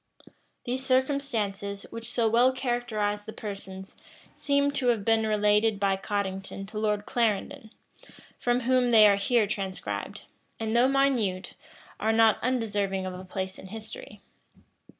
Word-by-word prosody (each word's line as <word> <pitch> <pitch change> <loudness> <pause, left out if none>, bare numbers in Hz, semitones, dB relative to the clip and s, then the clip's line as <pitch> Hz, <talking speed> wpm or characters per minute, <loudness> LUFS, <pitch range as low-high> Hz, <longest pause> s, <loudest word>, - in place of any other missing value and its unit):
These 255 +2 -3
circumstances, 250 -7 -1
which 230 0 -5
so 235 -2 +1
well 240 +3 +4
characterize 240 -5 -2
the 220 - -8
persons, 195 -2 -8 0.4
seem 280 0 +1
to 275 -3 -1
have 225 -5 +1
been 225 -1 +3
related 210 0 +2
by 195 -1 +2
Cottington 195 0 -4
to 215 -1 -5
Lord 210 -1 0
Clarendon, 230 +2 -1 0.7
from 245 +1 +1
whom 255 0 +2
they 220 -3 +8
are 200 -1 +4
here 225 +2 +2
transcribed; 195 -3 -4 0.4
and 225 0 -2
though 245 +2 +5
minute, 255 -9 +1 0.5
are 220 - +1
not 225 -1 +4
undeserving 205 -6 -1
of 185 - -4
a 180 +1 -8
place 190 0 -5
in - - -10
history. 225 - -9
220 Hz, 140 wpm, -27 LUFS, 200-245 Hz, 0.7 s, they